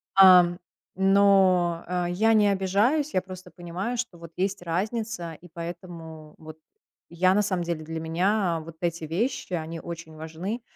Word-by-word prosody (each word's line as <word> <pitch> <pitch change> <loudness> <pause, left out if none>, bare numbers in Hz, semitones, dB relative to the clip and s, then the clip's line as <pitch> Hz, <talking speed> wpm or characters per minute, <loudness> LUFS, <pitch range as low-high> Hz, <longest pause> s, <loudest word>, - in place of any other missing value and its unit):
ам. 180 -2 +7 0.4
Но, 190 -3 +4
э, 180 0 -1
я 220 +5 +3
не 210 -2 +4
обижаюсь. 205 +11 +1
Я 185 - +3
просто 185 -1 -10
понимаю, 180 +7 -5
что 230 -7 -4
вот 170 -1 -11
есть 195 +1 -1
разница, 185 +1 -3
и 175 +3 -14
поэтому 165 -2 -8
вот 155 0 -11 0.5
я, 185 +2 +2
на 205 - +3
самом 185 -4 -1
деле, 170 -2 -3
для 160 +1 -5
меня 175 +2 0
вот 165 0 -11
эти 170 -1 -2
вещи, 185 - -2
они 165 -1 -4
очень 170 -1 -8
важны. 165 +9 -5
180 Hz, 155 wpm, -26 LUFS, 165-195 Hz, 0.5 s, ам